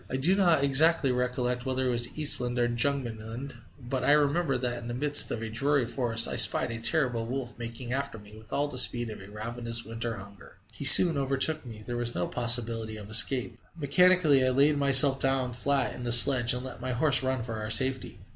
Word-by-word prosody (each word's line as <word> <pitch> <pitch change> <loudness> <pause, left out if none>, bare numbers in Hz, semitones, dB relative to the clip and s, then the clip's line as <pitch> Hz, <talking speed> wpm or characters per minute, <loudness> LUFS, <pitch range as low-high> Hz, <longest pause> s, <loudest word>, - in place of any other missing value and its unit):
I 130 - -5
do 160 +8 +1
not 175 -7 0
exactly 140 +1 +1
recollect 125 0 -4
whether 130 0 -4
it 125 - -2
was 120 +2 -4
Eastland 125 -5 +1
or 120 -1 -1
Jugemanland, 120 0 -6 0.2
but 125 0 -7
I 145 - +1
remember 150 -1 -1
that 120 -1 -6
in 120 - -11
the 120 - -7
midst 145 +2 +3
of 115 - -7
a 110 - -7
dreary 140 +3 -2
forest 115 -1 -3
I - - -6
spied - - +2
a 115 - -8
terrible 120 -3 -1
wolf 125 -1 -7
making 120 +1 -9
after 140 -3 -6
me 105 0 -17
with 110 0 -16
all 145 +1 -3
the 130 -3 -3
speed 120 -2 0
of 110 - -12
ravenous 115 +2 -7
winter 115 +1 -7
hunger. 100 -2 -16 0.2
He 140 - -7
soon 160 +2 +9
overtook 135 +2 -2
me; 110 -2 -12
there 120 0 -7
was 120 0 -5
no 90 - -4
possibility 115 -2 0
of 105 0 -13
escape. 115 0 +1 0.2
Mechanically 160 -2 +1
I 130 - 0
laid 140 +4 0
myself 140 -1 +5
down 135 -2 -3
flat 135 +2 -3
in 125 - -11
the 120 - -5
sledge, 120 0 +6
and 125 +1 -8
let 125 -2 -11
my 130 0 -6
horse 135 +1 +2
run 130 -2 -4
for 115 -1 -8
our 110 0 -8
safety. 130 +3 -1
125 Hz, 210 wpm, -25 LUFS, 115-140 Hz, 0.2 s, soon